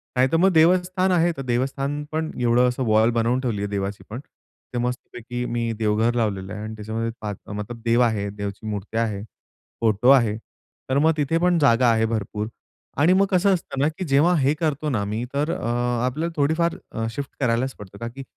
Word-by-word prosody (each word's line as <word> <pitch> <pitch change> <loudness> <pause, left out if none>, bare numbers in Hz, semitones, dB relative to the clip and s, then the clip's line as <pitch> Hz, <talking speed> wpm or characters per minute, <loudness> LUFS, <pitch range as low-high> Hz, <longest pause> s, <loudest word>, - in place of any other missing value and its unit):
नाहीतर 130 +5 +3
मग 190 +3 +5
देवस्थान 185 +3 +3
आहे, 175 -1 +3
तर - - -4
देवस्थान 135 +3 -1
पण 160 0 -2
एवढं 120 +1 +3
असं 125 +1 -2
वॉल 110 +1 +4
बनवून 120 +2 +1
ठेवली 115 -6 -2
आहे 100 - -1
देवाची 100 0 -3
पण. 115 - -5 0.5
ते 120 - -2
मस्तपैकी 125 0 -4
मी 120 -1 -2
देवघर 110 +2 +2
लावलेलं 100 -4 -1
आहे 105 - -6
आणि 110 0 -6
त्याच्यामध्ये 110 +2 -3 0.2
आत 100 -1 -7
मतलब 105 +3 -6
देव 115 +1 +3
आहे, 110 -4 +1
देवची 100 +1 -6
मुरत्या 105 +2 -3
आहे, 105 -3 -3 0.6
फोटो 110 +2 +3
आहे. 115 -6 +5 0.5
तर 130 - +2
मग 160 +2 +4
तिथे 150 +2 +1
पण 175 +1 +3
जागा 125 -3 +4
आहे 110 0 +2
भरपूर 110 -1 -3 0.5
आणि 170 +5 +5
मग 195 +1 +4
कसं 190 +2 +4
असतं 170 -6 -4
ना, 145 - +3
की 185 - -3
जेव्हा 150 +4 +4
हे 140 +1 +3
करतो 155 -2 -1
ना 110 -7 0
मी 105 +3 -3
तर 145 +3 0
अ, - - -4 0.4
आपल्याला 155 +7 -2
थोडीफार 160 +4 +1 0.2
अ, 115 - -3
शिफ्ट 140 +4 -5
करायलाच 130 0 0
पडतं, 100 -1 -11
का 115 - -5
की 135 +4 -8
120 Hz, 195 wpm, -23 LUFS, 110-150 Hz, 0.6 s, मग